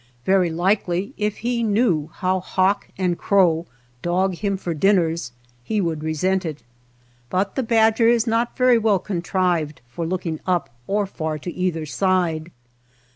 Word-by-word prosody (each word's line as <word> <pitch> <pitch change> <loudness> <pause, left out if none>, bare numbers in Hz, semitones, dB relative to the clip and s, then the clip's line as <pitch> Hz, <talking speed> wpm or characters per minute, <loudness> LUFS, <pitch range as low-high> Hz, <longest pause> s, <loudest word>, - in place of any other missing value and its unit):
Very 190 -2 +3
likely 180 +2 0
if 210 0 -2
he 240 -1 0
knew 205 -9 +1
how 185 +2 0
hawk 185 +2 0
and 180 -2 0
crow 175 -4 +3 0.3
dog 185 +2 +1
him 200 +2 -2
for 175 -3 -3
dinners, 165 -5 +1 0.3
he 215 - -1
would 165 -5 -1
resent 185 +5 0
it. 155 -3 -6 0.7
But 195 +2 0
the 265 - -1
badger 225 -1 +3
is 235 -1 +4
not 230 +1 0
very 250 -2 +5
well 215 -3 +3
contrived 175 -4 -1
for 160 +8 -4
looking 170 -3 -3
up 180 -7 0 0.2
or 205 +1 +1
far 160 -5 -4
to 170 +3 -6
either 175 -4 -1
side. 165 +2 0
185 Hz, 150 wpm, -22 LUFS, 165-205 Hz, 0.7 s, very